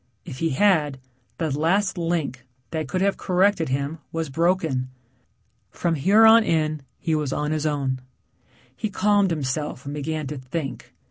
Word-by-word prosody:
If 140 Hz, -7 st, -8 dB
he 165 Hz, -, +1 dB
had, 155 Hz, -3 st, +2 dB, 0.4 s
the 155 Hz, -4 st, -1 dB
last 190 Hz, +6 st, +1 dB
link, 165 Hz, -7 st, -2 dB, 0.3 s
that 155 Hz, -2 st, -2 dB
could 185 Hz, +6 st, -2 dB
have 200 Hz, 0 st, +2 dB
corrected 185 Hz, -3 st, +2 dB
him 140 Hz, +4 st, -2 dB
was 165 Hz, -3 st, -3 dB
broken. 160 Hz, -5 st, +1 dB, 0.8 s
From 170 Hz, -, -1 dB
here 195 Hz, +9 st, +5 dB
on 225 Hz, +1 st, +8 dB
in 155 Hz, -3 st, 0 dB, 0.2 s
he 165 Hz, -, -2 dB
was 150 Hz, -3 st, 0 dB
on 150 Hz, +2 st, -1 dB
his 155 Hz, 0 st, 0 dB
own. 135 Hz, -3 st, -1 dB, 0.7 s
He 215 Hz, -, -3 dB
calmed 205 Hz, 0 st, +2 dB
himself 145 Hz, -3 st, -3 dB
and 140 Hz, -, -5 dB
began 155 Hz, +1 st, -3 dB
to 140 Hz, 0 st, -5 dB
think. 135 Hz, +2 st, -5 dB
155 Hz, 155 wpm, -24 LUFS, 140-180 Hz, 0.8 s, on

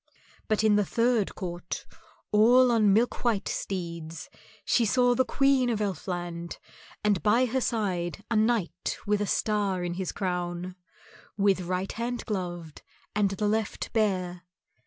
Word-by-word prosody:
But 215 Hz, -1 st, +1 dB
in 210 Hz, -1 st, +5 dB
the 205 Hz, -, +3 dB
third 230 Hz, 0 st, +1 dB
court, 175 Hz, -2 st, -5 dB, 0.5 s
all 245 Hz, +4 st, +6 dB
on 215 Hz, -3 st, +4 dB
milk 225 Hz, +5 st, +1 dB
white 230 Hz, -5 st, +1 dB
steeds, 170 Hz, -4 st, -5 dB, 0.3 s
she 240 Hz, -, +3 dB
saw 245 Hz, +2 st, +3 dB
the 260 Hz, -, +3 dB
Queen 270 Hz, -1 st, +2 dB
of 225 Hz, -3 st, 0 dB
Elfland, 175 Hz, -4 st, -4 dB, 0.5 s
and 205 Hz, -4 st, +2 dB
by 230 Hz, +4 st, +4 dB
her 260 Hz, +2 st, -1 dB
side 195 Hz, -6 st, -2 dB
a -, -, +2 dB
knight 220 Hz, -4 st, 0 dB
with 210 Hz, 0 st, +1 dB
a 205 Hz, -, 0 dB
star 200 Hz, -4 st, 0 dB
in 175 Hz, -1 st, -2 dB
his 185 Hz, 0 st, -3 dB
crown, 180 Hz, -1 st, -3 dB, 0.6 s
with 195 Hz, -2 st, +3 dB
right 185 Hz, +2 st, -2 dB
hand 240 Hz, +1 st, -4 dB
gloved 175 Hz, -6 st, -5 dB, 0.3 s
and 205 Hz, -1 st, +3 dB
the 200 Hz, +2 st, -1 dB
left 215 Hz, 0 st, -2 dB
bare. 185 Hz, -5 st, 0 dB
205 Hz, 145 wpm, -27 LUFS, 180-225 Hz, 0.6 s, all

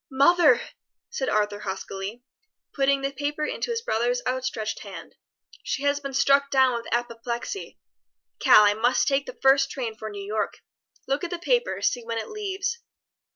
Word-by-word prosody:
"Mother!" 280 Hz, -1 st, +5 dB, 0.5 s
said 270 Hz, -, -2 dB
Arthur 205 Hz, -1 st, 0 dB
huskily, 195 Hz, +3 st, -6 dB, 0.5 s
putting 275 Hz, 0 st, +2 dB
the 275 Hz, -, 0 dB
paper 290 Hz, +2 st, -2 dB
into -, -, -3 dB
his 460 Hz, -1 st, -2 dB
brother's 245 Hz, -, 0 dB
outstretched 250 Hz, -4 st, -2 dB
hand. -, -, -10 dB, 0.5 s
"She 275 Hz, -, -3 dB
has 285 Hz, 0 st, +2 dB
been 275 Hz, -2 st, -6 dB
struck 280 Hz, +1 st, +4 dB
down 265 Hz, -2 st, +4 dB
with 235 Hz, -1 st, -5 dB
apoplexy. 240 Hz, -, -3 dB, 0.6 s
Cal, 210 Hz, -, +7 dB
I 205 Hz, 0 st, +5 dB
must 240 Hz, +4 st, +2 dB
take 280 Hz, 0 st, +1 dB
the -, -, -8 dB
first 270 Hz, 0 st, +5 dB
train 240 Hz, -6 st, -4 dB
for 220 Hz, 0 st, -7 dB
New 200 Hz, -1 st, -7 dB
York. 215 Hz, +1 st, -3 dB, 0.5 s
Look 275 Hz, +6 st, -1 dB
at 350 Hz, -, -2 dB
the 350 Hz, -, -3 dB
paper, 485 Hz, +7 st, 0 dB
see 245 Hz, -, +1 dB
when 230 Hz, 0 st, -4 dB
it 225 Hz, -, -4 dB
leaves. 415 Hz, +2 st, -3 dB
265 Hz, 165 wpm, -25 LUFS, 230-285 Hz, 0.6 s, Cal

